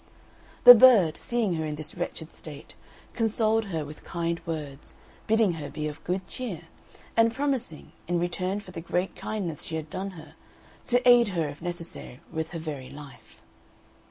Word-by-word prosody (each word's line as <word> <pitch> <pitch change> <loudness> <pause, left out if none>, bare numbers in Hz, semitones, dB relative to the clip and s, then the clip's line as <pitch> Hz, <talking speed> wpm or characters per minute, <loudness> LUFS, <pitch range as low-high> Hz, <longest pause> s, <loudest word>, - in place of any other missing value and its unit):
The 245 - +14
bird, 220 -10 +7
seeing 235 -6 -1
her 160 - -2
in 150 - -3
this 155 +1 -6
wretched 170 -2 -6
state, 150 -3 -11 0.4
consoled 225 -1 +1
her 165 -6 -3
with 150 +1 -11
kind 170 -1 -3
words, 150 -4 -6 0.3
bidding 220 -4 +3
her 145 - -5
be 150 +2 -4
of 150 - -8
good 185 +1 -2
cheer, 225 -11 -5 0.5
and 230 0 +5
promising, 260 - -3 0.2
in 175 0 +1
return 180 +3 -1
for 185 - -12
the 165 - -6
great 180 +3 -2
kindness 185 -8 -4
she 160 - -5
had 155 -1 -5
done 195 +1 -3
for 190 - -12
her, 160 - -12 0.5
to 245 +1 +2
aid 240 -1 +7
her 170 -6 -1
if 145 - -10
necessary 170 -7 -6
with 160 -1 -3
her 170 - -6
very 145 -5 -6
life. 140 -3 -13
175 Hz, 175 wpm, -27 LUFS, 155-220 Hz, 0.5 s, The